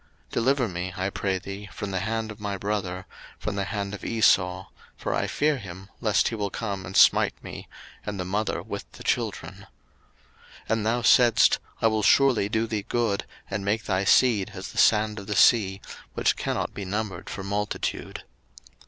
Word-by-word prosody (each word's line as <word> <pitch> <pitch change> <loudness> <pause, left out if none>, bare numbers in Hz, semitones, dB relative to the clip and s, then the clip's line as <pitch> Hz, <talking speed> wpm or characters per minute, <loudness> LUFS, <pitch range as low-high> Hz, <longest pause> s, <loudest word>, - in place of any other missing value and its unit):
01:032:011 - - -28
Deliver 130 +1 +2
me, 90 -1 -4
I 95 +1 -1
pray 95 -1 -1
thee, 100 +2 -8
from 100 -1 -5
the 95 - -1
hand 110 +2 -2
of 105 - -11
my 100 -1 -3
brother, 95 -2 -3 0.3
from 110 - -4
the 100 -1 -1
hand 100 -1 -3
of 105 - -7
Esau: 95 -4 +2 0.3
for - - -2
I - - 0
fear 150 -1 +1
him, 95 -2 -10
lest 110 -3 +2
he - - -7
will 105 -2 -2
come 100 -3 -4
and 95 - -3
smite - - +5
me, - - -8 0.4
and 105 -2 -5
the 90 - -2
mother 105 +3 -1
with - - -7
the - - -11
children. - - -2 1.0
01:032:012 - - -26
And 110 -1 0
thou 120 +2 +1
saidst, 120 0 +5 0.2
I - - +4
will 110 -1 +1
surely 115 -2 +4
do 110 +1 +1
thee 110 -3 -3
good, 115 -4 0 0.2
and 100 - -3
make 105 +3 0
thy 95 -1 0
seed 105 -1 +4
as - - -6
the - - -3
sand 105 -1 +3
of 100 - -10
the 105 - -2
sea, 95 -5 +4 0.3
which - - +2
cannot - - -2
be 100 - -6
numbered 95 -1 -4
for 95 - -5
multitude. 100 +1 -3
105 Hz, 190 wpm, -26 LUFS, 95-110 Hz, 1.0 s, smite